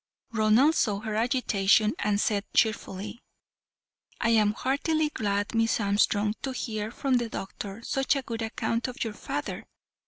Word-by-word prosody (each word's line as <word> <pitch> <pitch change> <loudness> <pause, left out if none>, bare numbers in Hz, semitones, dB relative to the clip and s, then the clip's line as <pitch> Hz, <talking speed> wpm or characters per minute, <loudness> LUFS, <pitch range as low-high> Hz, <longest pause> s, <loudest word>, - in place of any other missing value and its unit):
Ronald 225 +7 +4
saw 205 -9 +1
her 215 0 -4
agitation, 215 -3 +2
and 205 -1 +1
said 205 -1 +1
cheerfully: 215 0 0 1.0
"I 230 - +1
am 215 -2 +4
heartily 300 +5 0
glad, 205 -5 -1
Miss 225 0 +2
Armstrong, 205 0 +2
to 265 - -3
hear 215 -4 -3
from 260 +2 0
the 240 -1 -2
doctor 200 +2 -6
such 270 +3 +1
a 275 - -2
good 230 -1 -5
account 230 +1 -1
of 250 - -4
your 225 -2 -4
father. - - -5
220 Hz, 150 wpm, -27 LUFS, 210-245 Hz, 1.0 s, Ronald